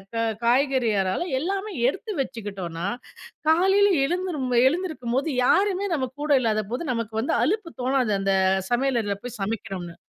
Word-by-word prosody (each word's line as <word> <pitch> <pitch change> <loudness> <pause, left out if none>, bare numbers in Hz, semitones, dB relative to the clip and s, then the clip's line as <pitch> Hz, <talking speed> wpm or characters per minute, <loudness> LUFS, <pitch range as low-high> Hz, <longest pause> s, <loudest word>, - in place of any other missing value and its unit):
க - - -1 0.3
காய்கறியானாலும் 245 - +1
எல்லாமே 390 +6 -2 0.2
எடுத்து 420 +7 -5
வச்சுக்கிட்டோம்னா, 195 -8 -5 0.6
காலையில் 385 +4 +4
எழுந்திரும் 345 -5 -2 0.2
எழுந்திருக்கும்போது 295 -5 -1 0.2
யாருமே 400 +2 +2
நம்ம 260 -3 -2
கூட 300 0 -1
இல்லாதபோது, 220 +5 -1
நமக்கு 225 -2 -4
வந்து 260 - 0
அலுப்பு 380 -1 -1
தோணாது, 255 -4 +1
அந்த 195 0 +1 0.4
சமையலறைல 240 -6 +1
போய் 245 -2 -7
சமைக்கிறோம்னு. 195 -5 -4
260 Hz, 120 wpm, -24 LUFS, 215-350 Hz, 0.6 s, காலையில்